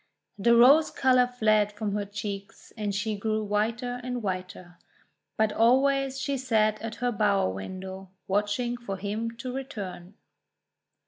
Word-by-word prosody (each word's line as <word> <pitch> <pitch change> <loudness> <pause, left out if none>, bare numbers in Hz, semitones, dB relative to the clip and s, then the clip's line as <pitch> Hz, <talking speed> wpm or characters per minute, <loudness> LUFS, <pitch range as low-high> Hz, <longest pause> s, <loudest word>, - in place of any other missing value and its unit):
The 235 +4 +4
rose 275 +7 +7
colour 255 -1 +3
fled 215 -4 +2
from 210 -1 -3
her 205 0 -1
cheeks, 200 -1 -7
and 210 -3 -3
she 215 +1 -1
grew 215 +1 -1
whiter 230 +4 -1
and 250 -2 -4
whiter. 185 -2 -5 0.6
But 220 -1 +2
always 270 +3 +3
she 280 0 -1
sat 215 -4 +1
at 225 -1 -5
her 245 0 -1
bower 200 - +2
window 190 - -7 0.2
watching 210 +5 0
for 200 -5 -5
him 210 +4 -3
to 250 +1 -5
return. 200 -9 -7
215 Hz, 140 wpm, -27 LUFS, 200-245 Hz, 0.6 s, rose